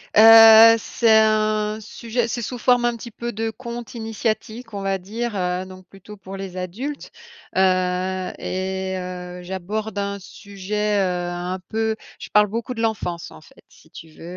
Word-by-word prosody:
Heu, 225 0 +9
c'est 230 +1 -1
un 215 -1 +3
sujet 230 +2 -3
c'est 235 +1 -3
sous 245 +2 -5
forme 245 +1 +3
un 240 0 +1
petit 235 +1 -9
peu 235 +2 -6
de 225 0 -3
conte 235 0 -8
initiatique, 225 +1 -4
on 200 - -4
va 195 0 -1
dire, 220 +4 -5
heu, 180 -1 -2
donc 185 -1 -13
plutôt 195 +3 -13
pour 195 0 -9
les 195 -2 -7
adultes. 220 +11 -5 0.5
Heu, 185 0 +1
et 190 0 -3
heu, 180 0 -7
j'aborde 195 +4 -5
un 200 0 -3
sujet, 205 +1 -3
heu, 180 -2 -1
un 175 +1 -4
peu 220 0 -1 0.2
je - - -9
parle 210 0 +5
beaucoup 230 +4 -4
de 225 - -4
l'enfance, 180 -6 -3
en 80 - -14
fait, - - -20
si - - -21
tu 160 - -12
veux. 155 - -15
210 Hz, 170 wpm, -22 LUFS, 185-225 Hz, 0.5 s, Heu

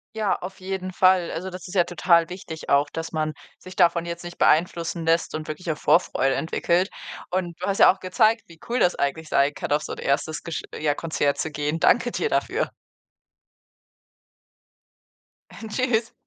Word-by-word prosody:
Ja, 215 -3 +1
auf 190 +2 -8
jeden 185 0 -4
Fall. 185 -1 +3
Also, 185 +3 -4
das 185 0 -9
ist 180 - -9
ja 180 -3 +3
total 170 -1 +3
wichtig 175 -3 -8
auch, 140 +1 +4
dass 165 0 -5
man 155 -1 -1 0.2
sich 185 0 -12
davon 170 -2 +3
jetzt 170 0 -6
nicht 175 0 -8
beeinflussen 165 0 +1
lässt 165 +1 +2
und 155 0 -5
wirklich 160 +3 -4
auch 155 - -4
Vorfreude 135 -1 +2
entwickelt. 170 +3 0 0.4
Und 175 -2 -2
du 180 - -3
hast 200 0 -1
ja - - +8
auch 190 - -9
gezeigt, 220 +4 +2
wie 165 -1 -16
cool 240 - 0
das 180 - +4
eigentlich 150 +3 -2
sein 140 +1 +2
kann, - - -5
auf 150 +1 +3
so - - -5
'n - - -8
1. 155 +3 -1
gesch 170 -2 -4 0.2
ja 150 -1 +1
Konzert 145 -2 -1
zu 160 - -1
gehen. 150 +2 -2
Danke 240 +5 +3
dir 450 - -1
dafür. - - 0 2.8
Äh, 225 - -9
tschüss. 230 0 0
170 Hz, 185 wpm, -24 LUFS, 155-185 Hz, 2.8 s, ja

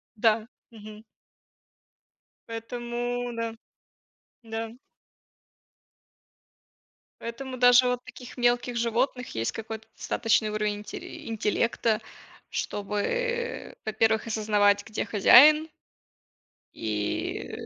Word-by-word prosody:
Да, 220 0 +2 0.2
мгм. 215 -1 -12 1.4
Поэтому, 240 +1 -4
да, 230 -1 -3 0.9
да. 225 0 -5 2.5
Поэтому 255 +3 -6
даже 245 0 +6
вот 250 0 0
у - - -64
таких 250 +1 -11
мелких 245 0 +1
животных 235 +2 0
есть 115 +1 -1
какой-то 225 0 -7
достаточный 225 -2 +1
уровень 210 -1 -1
инти 210 - -8
интеллекта, 225 0 0 0.5
чтобы, 475 - -2
во-первых, 220 +1 +1
осознавать, 210 -2 +2
где 215 - -3
хозяин. 300 +9 +7 1.1
И 105 -2 -3
230 Hz, 80 wpm, -27 LUFS, 215-245 Hz, 2.5 s, хозяин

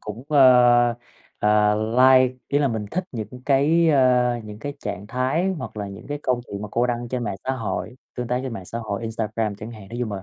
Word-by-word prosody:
cũng, 110 +5 -8
ơ, 130 -4 +6 0.8
ờ, 105 0 +3 0.2
like, 130 0 +5
ý 145 - +2
là 140 -2 +2
mình 110 -3 -3
thích 185 +2 -2
những 120 +2 -7
cái, 155 +4 +3
ơ, 125 -4 +3
những 105 0 -9
cái 145 +5 -5
trạng 100 -5 -6
thái 130 - 0
hoặc - - -7
là 100 -1 -4
những 100 - -10
cái 145 0 -4
câu 125 -1 0
chuyện 100 +1 -7
mà 105 - -5
cô 120 +1 +2
đăng 120 -1 -3
trên 125 -1 -3
mạng 100 -2 -3
xã 130 - -1
hội, 125 +1 -4 0.2
tương 125 -1 -3
tác 125 +1 -1
trên 130 -3 -5
mạng 95 -5 -7
xã 115 +5 -6
hội, 110 -1 -4
Instagram 110 -1 -2
chẳng 110 +2 -8
hạn. 105 -4 -11
Nói 120 - -7
chung 110 -4 -2
là 95 - -5
120 Hz, 235 wpm, -23 LUFS, 105-130 Hz, 0.8 s, ơ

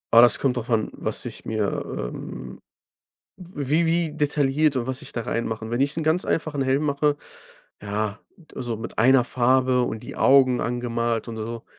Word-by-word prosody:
Ah, 115 - +10
das 120 - +6
kommt 130 -3 0
darauf 120 +1 -4
an, 110 -2 +1
was - - -4
ich - - -7
mir, 110 -3 -1
ähm 60 +1 -7 0.8
wie 165 -3 -1
wie 165 -1 +1
detailliert 145 0 +2
und 125 0 -2
was 130 +1 -2
ich 145 - -10
da 120 - -3
rein 115 +1 -2
mache. 110 0 -5
Wenn 120 +2 -1
ich 140 +3 +1
'n 165 - -1
ganz 160 +3 +1
einfachen 150 -3 -1
Helm 135 +3 +1
mache, 145 0 +1 0.7
ja, 105 0 -2 0.2
d 165 - -20
also 120 -3 -3
mit 115 0 -8
einer 130 +3 +6
Farbe 130 0 +2
und 110 - -4
die - - -9
Augen 130 -2 +5
angemalt 120 -1 -1
und 115 - -6
so, 115 +1 -5
130 Hz, 190 wpm, -24 LUFS, 115-145 Hz, 0.8 s, Ah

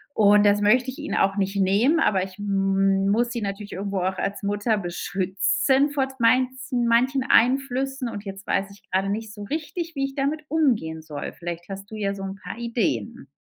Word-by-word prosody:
Und 210 -1 +5
das 205 0 +4
möcht 245 +5 +4
ich 260 - -5
ihnen 300 - -3
auch 195 0 +2
nicht 195 0 -1
nehmen, 205 - +3
aber 190 -11 +2
ich 190 0 -9
muss 195 +3 +1
sie 235 - -3
natürlich 200 0 -5
irgendwo 200 0 -3
auch 190 +1 -1
als 200 +1 -3
Mutter 205 +2 0
beschützen 195 +9 +1
vor 275 -2 0
meinzen 255 +1 +2
manchen 255 +3 +3
Einflüssen. 265 +1 +2
Und 205 -2 -6
jetzt 195 0 -8
weiß 195 +1 0
ich 200 - -17
gerade 190 +1 +1
nicht 215 +1 -4
so 205 - -8
richtig, 325 - -4
wie 275 - 0
ich 275 - -6
damit 285 +3 -1
umgehen 230 - +1
soll. 155 -2 -6
Vielleicht 175 0 -6
hast 195 +1 -7
du 220 - -6
ja 200 -2 -1
so 195 - -8
'n 195 0 -5
paar - - -7
Ideen. 225 - -2
205 Hz, 190 wpm, -24 LUFS, 195-255 Hz, -, Und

